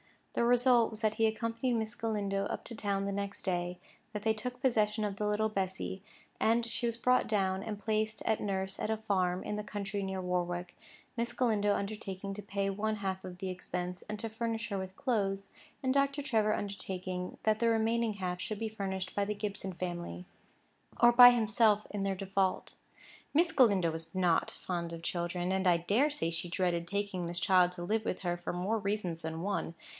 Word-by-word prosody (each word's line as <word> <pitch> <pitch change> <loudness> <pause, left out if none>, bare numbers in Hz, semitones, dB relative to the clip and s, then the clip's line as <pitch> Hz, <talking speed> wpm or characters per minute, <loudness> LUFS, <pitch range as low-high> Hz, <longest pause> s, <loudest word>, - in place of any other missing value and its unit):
The - - +1
result 245 -1 +5
was 220 -1 -8
that 215 -1 +1
he 225 0 +4
accompanied 230 +3 -1
Miss 220 -1 -1
Galindo 205 -4 -1
up - - -4
to 235 - -7
town 200 -2 -1
the 200 - -1
next 200 0 -4
day; 175 -1 -1 0.4
that 210 -1 -4
they 220 -1 +3
took 245 +3 -5
possession 215 -5 +2
of 200 -1 -2
the 210 - 0
little 215 +1 +1
Bessy, 190 -1 -2 0.4
and 230 +1 +3
she 235 +1 -1
was 230 -1 -1
brought 250 +1 +3
down, 190 -3 +1
and 215 -2 -4
placed 215 +1 -1
at 220 - +1
nurse 190 -1 -2
at - - -2
a 220 - +1
farm 185 -4 0
in 210 - -3
the 210 - -3
country 200 -1 -3
near 190 -1 -3
Warwick, 175 -1 -2 0.4
Miss 235 +1 0
Galindo 210 -5 +2
undertaking 200 -1 -4
to 210 - -6
pay 200 0 -2
one 215 +2 -1
half 190 -2 -3
of 180 -1 -7
the 190 +1 -4
expense, 180 0 -4
and 210 - -3
to 225 - 0
furnish 230 0 -3
her 200 - -1
with 190 0 -5
clothes, 195 -6 -1 0.3
and 260 0 +2
Dr. 280 +1 +2
Trevor 215 -5 +2
undertaking 185 -3 -4
that 215 0 +2
the 235 - +3
remaining 225 0 +2
half 180 -3 -3
should 215 - -3
be 225 -1 -2
furnished 190 -3 -4
by 200 - +1
the 210 +1 -2
Gibson 200 -2 -4
family, 175 0 -5 0.7
or 240 - +8
by 245 +1 +11
himself 215 -2 +3
in 205 - -3
their 195 -1 0
default. 195 0 -1 0.6
Miss 330 +2 +4
Galindo 200 - +4
was 160 +2 -6
not 175 -3 +3
fond 170 -2 -4
of 165 0 -7
children; 175 +1 -1
and 190 0 +1
I 175 -1 +6
dare 210 - +2
say 225 - -1
she 170 +1 -3
dreaded 170 -1 0
taking 200 -2 -2
this 175 0 -2
child 180 -1 +4
to 175 -1 -6
live 215 +4 0
with - - -2
her 175 -2 -1
for 175 - -4
more 195 +6 0
reasons 195 -5 -2
than 160 0 -4
one. 195 -3 -2
200 Hz, 200 wpm, -32 LUFS, 185-220 Hz, 0.7 s, by